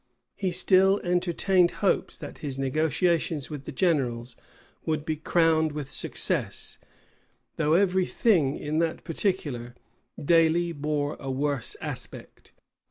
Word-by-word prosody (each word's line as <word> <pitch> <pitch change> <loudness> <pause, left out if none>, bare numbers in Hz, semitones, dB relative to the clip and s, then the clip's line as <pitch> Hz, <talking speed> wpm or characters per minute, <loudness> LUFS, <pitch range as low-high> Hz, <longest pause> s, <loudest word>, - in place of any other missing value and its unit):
[*] - - -56
He 195 -2 -1
still 190 +2 +4
entertained 180 0 +2 0.2
hopes - - +1
that 145 - -9
his 140 -3 -4
negotiations 155 +2 0
with 145 -2 -7
the - - -6
generals 130 -7 0 0.5
would 155 -1 -2
be 155 - -1
crowned 160 0 +2
with 145 -3 -6
success; - - -1 0.8
though 155 0 +2
every 185 0 +3
thing, 165 - +2
in 150 +2 -2
that 165 -1 -1
particular, 145 - -3 0.4
daily 165 +2 +3
bore 150 -1 -2
a 135 - -6
worse 140 -1 -1
aspect. - - -7
160 Hz, 125 wpm, -26 LUFS, 145-175 Hz, 0.8 s, still